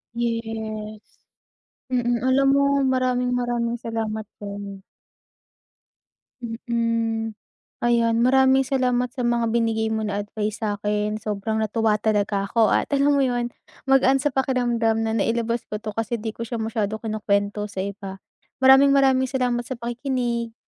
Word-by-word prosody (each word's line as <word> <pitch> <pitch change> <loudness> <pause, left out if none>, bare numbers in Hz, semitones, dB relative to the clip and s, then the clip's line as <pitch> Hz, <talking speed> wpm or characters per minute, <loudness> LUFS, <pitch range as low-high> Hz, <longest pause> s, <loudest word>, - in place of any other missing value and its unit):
Yes, 220 -2 -4 0.9
mm, 240 -2 0
alam 270 +1 +3
mo 280 - +3 0.2
maraming 255 -1 +1
maraming 240 -1 -1
salamat 220 -1 -3
din. 200 -1 -7 1.6
Mm, 230 -1 -2 0.5
ayan 230 -1 +2
maraming 265 +1 +5
salamat 250 -2 0
sa 245 0 -4
mga 235 -1 +1
binigay 225 -1 0
mo 220 0 -1
na 205 -1 -2
advice 210 +1 -4
sa'kin, 210 0 -1
sobrang 215 0 -3
natuwa 220 0 +1
talaga 205 -2 0
ako 220 +1 +2
at - - +2
alam 280 +1 +3
mo - - +3
'yun 245 -1 -1 0.4
magaan 270 0 +4
sa 295 - +1
pakiramdam 240 -4 +1
na 225 0 0
nailabas 230 +2 0
ko 210 0 -6
'to 215 -2 -6
kasi 225 0 -2
'di 220 - -3
ko 230 - -4
siya 230 -1 -4
masyado 220 -1 -2
kinukuwento 210 -2 -1
sa 200 -2 -5
iba. 195 -1 -6 0.4
Maraming 270 +1 +7
maraming 265 -1 +4
salamat 250 -2 -1
sa 260 - -4
pakikinig. 240 -1 -3
230 Hz, 135 wpm, -23 LUFS, 215-245 Hz, 1.6 s, Maraming